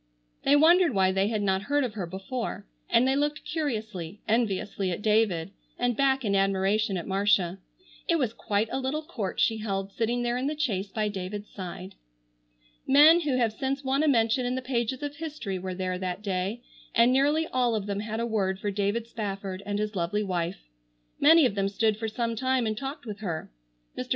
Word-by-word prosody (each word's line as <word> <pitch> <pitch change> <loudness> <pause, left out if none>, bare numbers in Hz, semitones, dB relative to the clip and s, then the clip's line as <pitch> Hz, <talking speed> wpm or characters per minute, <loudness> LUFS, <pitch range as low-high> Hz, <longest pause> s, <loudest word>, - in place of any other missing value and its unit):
They 285 - +4
wondered 330 - +5
why 190 -1 +4
they 195 +1 +1
had 215 -1 -1
not 190 -1 +1
heard 285 +7 +1
of 245 -4 -3
her 195 -5 -4
before, 195 +7 -5 0.2
and 250 +2 +4
they 265 - +2
looked 295 +1 -1
curiously, 215 - -3
enviously 205 -3 0
at 180 +3 -4
David, 210 -5 +2 0.3
and 245 -1 +1
back 270 -1 +2
in 200 -1 +1
admiration 195 +1 +1
at 170 - -5
Marcia. 195 -2 +1 0.5
It 335 - +3
was 250 -7 0
quite 210 -1 -1
a - - -1
little 270 +4 -2
court 215 -10 -4
she 225 - +3
held 195 -2 -3
sitting 235 +3 -1
there 240 0 0
in 260 +2 -1
the 300 +1 -2
chaise 210 -10 -1
by 215 0 -1
David's 205 +1 -5
side. 185 0 -7 0.9
Men 300 +5 +7
who 290 -6 0
have 230 -3 +1
since 270 +4 -2
won 270 +2 +1
a 310 - +2
mention 230 -2 +3
in 245 +1 -1
the 260 - -2
pages 250 +1 -2
of 290 0 -4
history 290 - -4
were 185 0 -5
there 185 -1 -2
that 185 +2 -4
day, 195 +4 -2 0.3
and 235 +2 +5
nearly 295 +4 +3
all 245 -3 +1
of 210 -2 -2
them 200 -1 -2
had 215 +1 -4
a 235 - 0
word 195 -4 -1
for 205 - -2
David 205 +3 -1
Spafford 195 -4 -5
and 205 0 -1
his 210 0 -2
lovely 190 +4 0
wife. 180 -2 -3 0.6
Many 315 +1 +7
of 245 - +1
them 195 -1 0
stood 215 +2 +1
for 220 +1 -4
some 230 +1 -2
time 260 +1 +1
and 215 -1 -1
talked 270 +4 -6
with 210 -3 -6
her. 170 - -4 0.4
Mr. - - -5
220 Hz, 205 wpm, -27 LUFS, 195-260 Hz, 0.9 s, Men